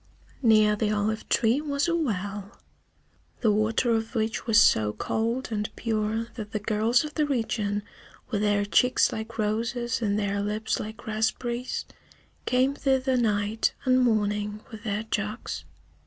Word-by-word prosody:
Near 215 -3 +5
the 210 0 0
olive 215 +1 -1
tree 235 +5 +3
was 285 0 -1
a 335 - +1
well, 205 - -3 0.8
the 220 - +4
water 220 +3 +1
of 225 +2 -1
which 220 +1 -1
was 225 -1 +6
so 105 - +4
cold 230 - -2
and 210 -1 -1
pure 220 0 -1
that 215 -3 -8
the 215 - 0
girls 220 +4 +2
of 300 -1 -6
the 300 -2 +1
region, 215 -5 -1 0.5
with 210 - 0
their 205 -1 +2
cheeks 225 +6 +3
like 220 +1 -6
roses 230 +3 -1
and 205 -2 +1
their 200 -1 -1
lips 210 +2 -1
like 220 +1 -7
raspberries, 235 +3 -2 0.6
came 255 +2 +3
thither 265 -2 +1
night 215 -2 +1
and 255 0 +4
morning 210 -2 0
with 220 0 -10
their 210 0 -1
jugs. 215 0 -4
220 Hz, 150 wpm, -26 LUFS, 210-240 Hz, 0.8 s, was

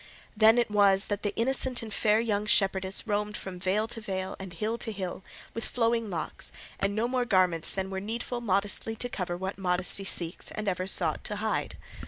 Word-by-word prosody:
Then 220 +3 +6
was 200 -2 +4
it - - -15
that 205 -1 -1
the 205 - -1
innocent 255 0 +2
and 220 -2 -6
fair 215 0 +3
young 210 -2 0
shepherdess 195 -1 +2
roamed 210 -1 -1
from 185 -2 -7
vale 195 +4 +1
to 230 - -5
vale 190 -2 -3
and 190 -1 -7
hill 215 +7 -2
to 225 - -3
hill, 190 -2 -5 0.3
with 230 - -4
flowing 230 -2 +1
locks, 165 -5 -2 0.3
and 200 +1 +1
no 225 +2 +1
more 250 0 +1
garments 185 -7 +2
than 190 0 -3
were 190 - -2
needful 235 +3 -3
modestly 205 +1 0
to 245 - -2
cover 180 -6 -3
what 190 +2 -4
modesty 180 +1 +1
seeks 175 -2 -3
and 215 -1 -4
ever 185 -1 0
sought 165 -5 +1
to 210 - -1
hide. 220 +1 -1
205 Hz, 200 wpm, -29 LUFS, 190-225 Hz, 0.3 s, Then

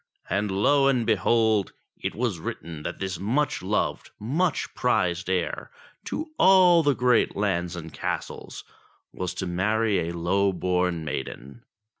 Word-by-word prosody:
And 100 +2 0
lo 135 +9 +3
and 125 -4 +2
behold! 110 0 +2 0.3
it - - -3
was 115 -7 -1
written 80 -1 -6
that - - -5
this 95 -3 -4
much 130 +8 0
loved, 100 +3 -1
much 150 - -1
prized 90 -7 0
heir 90 -2 -2 0.4
to 310 0 -4
all 185 -3 +6
the 145 -3 +2
great 125 -2 +2
lands 90 -4 -1
and 80 -2 -8
castles - - -5 0.5
was 90 0 -4
to 95 - -3
marry 100 0 0
a 85 - -5
low 95 +3 +1
born 90 -2 0
maiden. 65 -2 -6
100 Hz, 140 wpm, -25 LUFS, 90-120 Hz, 0.5 s, all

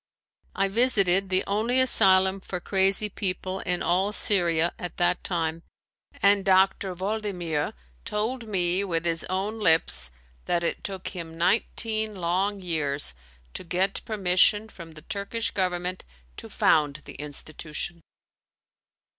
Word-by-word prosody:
I 195 - +1
visited 195 -4 +3
the 185 0 +2
only 225 +5 0
asylum 190 -6 +5
for 185 -1 -5
crazy 195 +3 +1
people 190 -1 -3
in 180 -1 -2
all 190 +4 +1
Syria 175 -5 +3
at 180 - -6
that 175 0 +1
time, 165 -2 -2 0.6
and 200 0 +4
Dr. 190 0 +2
Waldimier 185 -6 -3 0.3
told 225 +3 -3
me 185 -2 0
with 170 -3 -2
his 165 -1 +2
own 200 +4 -3
lips 160 - +3 0.4
that 170 -1 0
it - - -3
took 190 -2 -5
him 165 -3 -8
nineteen 215 +4 0
long 190 +3 -1
years 150 - +1 0.4
to - - -6
get 180 +3 -1
permission 205 +1 +2
from 165 -5 -12
the 155 -1 -13
Turkish 215 +2 -3
government 180 -1 -2 0.3
to - - -9
found 150 -1 +1
the - - -10
institution. 155 +3 -7
185 Hz, 130 wpm, -26 LUFS, 170-200 Hz, 0.6 s, asylum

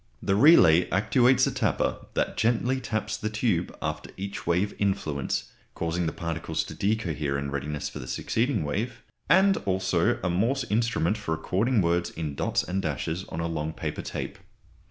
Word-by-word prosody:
The 95 - 0
relay 95 - +6
actuates 120 +6 +4
a - - 0
tapper - - -1
that - - 0
gently 120 +3 +1
taps 110 -3 -2
the 110 - -3
tube 110 -5 -1
after - - -3
each 100 +1 -6
wave 90 +4 +1
influence, 75 -9 -1 0.2
causing 85 +1 -1
the - - 0
particles 80 -3 -3
to 80 - -9
_de_cohere 80 -7 -1
in 70 0 -3
readiness 70 +1 -3
for - - -7
the 65 - -8
succeeding 115 - 0
wave, 105 +12 -3 0.3
and 195 +1 +5
also 95 -3 +1
a 90 - +1
Morse 120 +9 +1
instrument 110 -3 +1
for 90 -6 -2
recording 100 +7 +1
words 85 +1 +1
in 75 -3 -4
dots - - 0
and 95 +3 -2
dashes 80 +4 -3
on 80 - -4
a 85 - -1
long 80 -1 -3
paper 80 -3 -4
tape. - - -5
90 Hz, 170 wpm, -27 LUFS, 80-110 Hz, 0.3 s, relay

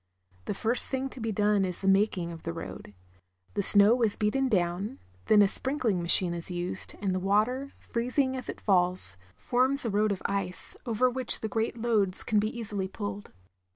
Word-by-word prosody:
The - - -4
first 230 +5 +1
thing 265 0 -3
to 260 - -12
be 225 -1 -3
done 205 -1 +1
is 180 -2 -4
the 195 - -3
making 195 -3 +1
of 165 -1 -10
the 165 - -6
road. 165 -10 -10 0.6
The 205 - -1
snow 205 +5 +4
is 220 -3 0
beaten 260 +5 -1
down, 180 0 -2 0.3
then 210 -1 +5
a - - +3
sprinkling 235 -4 -2
machine 170 +1 +3
is 170 +1 -7
used, 175 +1 -4
and 195 -2 -2
the 185 - -2
water, 215 +8 -1
freezing 255 +3 -2
as 255 - -8
it - - -7
falls, 180 - +7 0.2
forms 255 - +2
a 230 - -2
road 210 +1 0
of 195 - -5
ice, 195 -2 -1
over 235 +2 +1
which 255 -1 -2
the 220 - -3
great 225 +2 -3
loads 215 -5 +3
can 215 - 0
be 215 +1 -1
easily 210 -5 -5
pulled. 205 +1 -8
205 Hz, 190 wpm, -27 LUFS, 185-235 Hz, 0.6 s, falls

